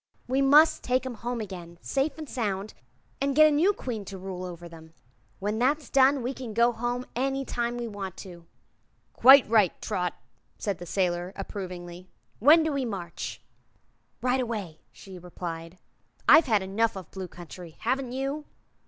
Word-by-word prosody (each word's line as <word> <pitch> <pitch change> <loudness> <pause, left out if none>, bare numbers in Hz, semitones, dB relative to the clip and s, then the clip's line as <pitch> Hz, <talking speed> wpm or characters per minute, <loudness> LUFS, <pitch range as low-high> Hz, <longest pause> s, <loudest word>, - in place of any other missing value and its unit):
We 260 +2 +1
must 295 +4 +6
take 255 +1 +1
'em 260 - -4
home 240 +2 -4
again, 175 -4 -8
safe 275 +2 -1
an' 315 - -6
sound, 210 -7 -3 0.5
and 275 -1 0
get 310 +1 +8
a 305 - +5
new 320 +7 +4
Queen 245 - -5
to 195 0 -7
rule 185 -1 -6
over 175 -1 -8
'em. 165 -1 -13 0.4
When 210 +2 -2
that's 285 +4 +1
done 270 0 +4
we 250 +3 -2
can 245 -5 -7
go 235 +1 +4
home 240 +2 -3
any 270 +2 -1
time 240 -1 -2
we 240 -1 -3
want 195 -3 -6
to." 170 -2 -12 0.7
"Quite 270 +2 +8
right, 215 -5 +3
Trot," 180 -1 -2 0.4
said 200 -5 -3
the 175 - -8
sailor, 180 0 -1
approvingly. 180 -2 -7 0.3
"When 310 +7 +7
do 315 - 0
we 275 -1 -1
march?" 190 -8 -5 0.8
"Right 255 +1 +2
away," 205 -10 -4
she 190 -2 -12
replied. 170 -1 -7 0.5
"I've 325 - +8
had 215 -5 +2
enough 210 +3 0
of 185 -4 -9
the - - -15
Blue 190 -1 -4
Country. 175 -1 -11
Haven't 255 +2 -1
you?" 275 +3 -3
220 Hz, 170 wpm, -27 LUFS, 180-260 Hz, 0.8 s, get